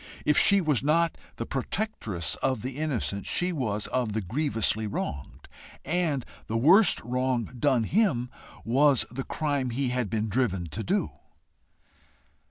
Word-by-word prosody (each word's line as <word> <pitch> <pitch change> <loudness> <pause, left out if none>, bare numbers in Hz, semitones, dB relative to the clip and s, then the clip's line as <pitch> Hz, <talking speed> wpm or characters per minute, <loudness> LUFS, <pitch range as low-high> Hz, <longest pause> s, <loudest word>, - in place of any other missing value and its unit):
If 150 - +3
she 200 +5 +6
was 150 -7 +1
not 165 +4 +2 0.2
the - - -4
protectress 115 - -2
of 130 -5 -1
the 130 +2 -5
innocent, 120 -10 -2
she 180 0 0
was 110 -8 -2
of 120 -5 -1
the 110 - -1
grievously 110 - 0
wronged, 70 -8 -5 0.4
and 155 -5 0 0.2
the 110 - -1
worst 175 - +6
wrong 125 -1 -1
done 130 -3 +2
him 130 - +1 0.3
was 135 +2 +3
the 135 +2 -4
crime 145 -4 -2
he 130 +2 -1
had 125 -4 -1
been 110 +1 -1
driven 100 -5 0
to 100 +9 -4
do. - - 0
130 Hz, 145 wpm, -27 LUFS, 110-150 Hz, 0.4 s, she